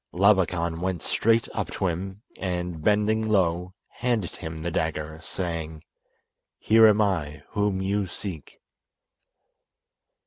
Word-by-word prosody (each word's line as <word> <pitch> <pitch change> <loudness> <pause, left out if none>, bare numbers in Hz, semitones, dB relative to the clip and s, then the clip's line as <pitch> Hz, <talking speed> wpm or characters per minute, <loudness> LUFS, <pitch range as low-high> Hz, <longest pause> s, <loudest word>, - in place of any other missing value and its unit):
Labakan 90 -4 +3
went 90 -3 -2
straight 115 +1 +2
up - - -2
to - - -2
him, 95 +4 -3 0.2
and, 90 -3 -3
bending 110 +2 +2
low, 90 -2 +1 0.2
handed 120 -7 -1
him 80 0 -6
the 85 - -2
dagger, 80 -1 -2
saying: 80 -3 -4 0.7
"Here 110 0 +6
am 105 0 +4
I 80 -8 -1
whom 100 -2 0
you 100 0 0
seek." 85 -4 -7
95 Hz, 115 wpm, -26 LUFS, 85-105 Hz, 0.7 s, Here